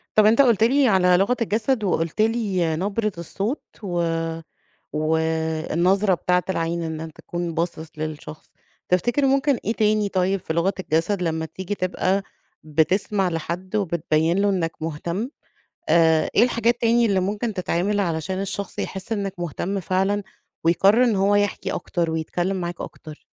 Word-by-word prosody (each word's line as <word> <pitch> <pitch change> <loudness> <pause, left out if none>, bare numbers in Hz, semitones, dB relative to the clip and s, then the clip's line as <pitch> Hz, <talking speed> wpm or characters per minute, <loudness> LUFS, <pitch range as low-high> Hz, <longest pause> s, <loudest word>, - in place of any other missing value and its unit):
طَب 215 - +6
أنت 225 +5 +6
قلُت 235 -5 +4
لي 265 +4 +4
على 180 -4 +4
لغة 200 +7 +2
الجسد 225 +2 0
وقُلت 170 0 0
لي 200 -8 +1
نبرة 205 +5 -1
الصوت 200 - -3 0.2
و 175 -3 -1 0.9
والنظرة 160 +5 +1
بتاعة 180 +1 +1
العين 170 -1 -1
إن 160 -1 -4
أنت 160 -1 -8
تكون 175 -1 -4
باصِص 165 -1 -2
للشخص، 155 0 -7 0.4
تفتكر 240 +10 +2
ممكن 275 +1 +3
إيه 225 - +1
تاني 215 -2 +2
طيب 190 0 0
في 160 - -4
لغة 170 +4 +1
الجسد 180 +3 0
لمّا 160 -1 -1
تيجي 190 +4 -5
تبقى 185 +1 0 0.4
بتسمع 180 +6 +1
لحد 175 +4 -4
وبتبيّن 170 -3 +1
له 205 +1 +3
إنّك 175 -5 0
مهتم، 170 +8 -3 0.6
آآ 160 - +4
إيه - - +5
الحاجات 235 -1 +2
تاني 235 0 +3
اللي 195 -3 +2
ممكن 205 +4 -2
تتعمل 190 +2 0
علشان 175 +1 -2
الشخص 200 0 -4
يحس 195 +4 -4
إنّك 200 -3 -2
مهتم 175 +4 -3
فعلًا 195 +3 0 0.4
ويقرّر 195 +8 +5
إن 230 -4 +2
هو 195 +1 +3
يحكي 205 -1 0
أكتر 170 -3 -2
ويتكلِّم 175 +4 -2
معاك 175 -1 -4
أكتر؟ 155 -2 -9
185 Hz, 150 wpm, -23 LUFS, 165-210 Hz, 0.9 s, طَب